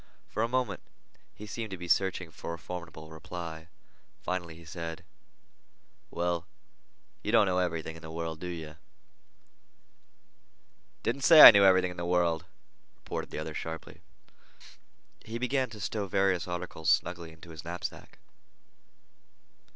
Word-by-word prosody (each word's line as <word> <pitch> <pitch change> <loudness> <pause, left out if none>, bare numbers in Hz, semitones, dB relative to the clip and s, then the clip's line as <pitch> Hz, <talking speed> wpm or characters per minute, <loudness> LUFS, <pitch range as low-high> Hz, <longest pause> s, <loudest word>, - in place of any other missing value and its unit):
For 110 - -2
a 115 - +2
moment 125 +1 -1 0.5
he 105 - -9
seemed 110 +1 -5
to 95 - -6
be 90 0 -7
searching 90 -1 +1
for 85 +1 -6
a - - -12
formidable 85 -2 -8
reply. 80 0 -7 0.6
Finally 85 -3 -3
he 85 0 -14
said: 85 0 -7 1.0
"Well, 85 -1 -2 0.7
you 105 - -2
don't 115 -2 +6
know 90 -1 +1
everything 80 -3 -2
in 80 - -12
the 80 - -9
world, 80 -1 -5
do 90 - -5
you?" 80 -3 -7 2.3
"Didn't 130 +4 -1
say 155 +3 +9
I - - +15
knew 100 -2 +5
everything 95 -1 +5
in 90 - -11
the 85 - -4
world," 85 -2 +1 0.5
retorted - - -6
the - - -7
other 80 0 -4
sharply. 80 +1 -7 1.2
He 115 +1 -5
began 130 +1 0
to 110 -2 -10
stow 100 +1 -3
various 95 -3 +1
articles 90 -3 -3
snugly 85 -1 +1
into 80 +1 -14
his 80 -1 -9
knapsack. 85 +1 -6
90 Hz, 145 wpm, -30 LUFS, 80-95 Hz, 2.3 s, I